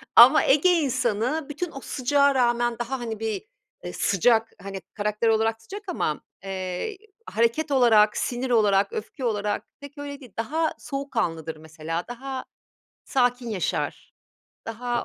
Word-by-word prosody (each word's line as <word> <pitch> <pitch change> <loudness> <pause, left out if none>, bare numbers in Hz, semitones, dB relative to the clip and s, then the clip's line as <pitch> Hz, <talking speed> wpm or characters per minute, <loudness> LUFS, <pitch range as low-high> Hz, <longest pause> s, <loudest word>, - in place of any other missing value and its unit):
ama 255 +6 +9
Ege 300 +7 +5
insanı 265 -1 0
bütün 320 +3 -4
o 275 - -7
sıcağa 280 +1 +2
rağmen 240 -1 +2
daha, 250 +2 -3
hani, 225 -3 -4
bir, 225 - -3 0.4
eee, - - -6
sıcak, 225 +4 +2
hani, 195 -1 -6
karakter 210 +2 -1
olarak 225 0 +2
sıcak 400 - -8
ama, 155 - -1 0.2
eee, 190 - -4 0.3
hareket 235 - +1
olarak, 220 -5 +5
sinir 250 +1 -2
olarak, 205 -4 +3
öfke 250 +4 -5
olarak 210 -2 -1 0.2
pek 285 +1 -11
öyle 285 0 -6
değil. 250 -8 -14
Daha 315 +8 0
soğukkanlıdır 215 - -3
mesela. 160 +2 -5
Daha 260 +2 -6 0.6
sakin 245 -2 +1
yaşar. 195 -5 -2 0.5
Daha 240 +1 -2
240 Hz, 135 wpm, -25 LUFS, 210-275 Hz, 0.6 s, ama